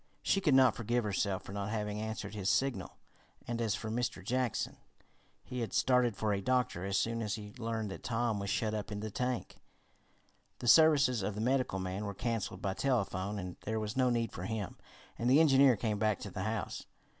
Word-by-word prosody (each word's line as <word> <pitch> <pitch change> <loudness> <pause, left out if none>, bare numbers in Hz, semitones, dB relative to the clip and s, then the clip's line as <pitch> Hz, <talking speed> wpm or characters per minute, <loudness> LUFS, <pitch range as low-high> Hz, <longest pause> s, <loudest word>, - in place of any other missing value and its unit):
She 195 - +2
could 150 -7 +4
not 130 -1 +6
forgive 120 +1 0
herself 100 -2 -1
for 95 - -9
not 100 0 -3
having 105 -1 -2
answered 110 -2 -4
his 100 -3 -1
signal, 130 -9 0 0.5
and 120 0 -2
as 110 -3 +1
for 110 - -5
Mr. 120 -5 -2
Jackson, 125 0 -1 0.7
he 125 - -5
had 115 - -3
started 125 -4 +3
for 105 -1 0
a 100 - -1
doctor 125 -5 0
as 100 0 0
soon 115 +2 0
as 105 -2 -1
he 105 -1 -9
learned 115 -3 -2
that - - -7
Tom 115 -2 -1
was 100 0 -3
shut 110 +2 0
up 105 -1 -4
in 105 0 -4
the 110 0 -4
tank. 125 +3 -3 1.0
The 120 - -5
services 145 -5 +6
of 100 +1 -2
the 105 - -3
medical 130 -4 +1
man 95 +2 -3
were 100 -1 -4
canceled 115 -5 -3
by 95 - 0
telephone, 105 -5 -1
as 90 -2 -5
there 110 +1 -1
was 105 -1 -4
no 130 -1 +3
need 115 -1 0
for 90 - -6
him, 105 -1 -3 0.4
and 120 - +1
the 135 +4 +6
engineer 135 -4 +6
came 105 -1 -2
back 110 -1 +2
to 105 - -6
the 95 - -5
house. 110 0 -3
110 Hz, 210 wpm, -33 LUFS, 100-125 Hz, 1.0 s, not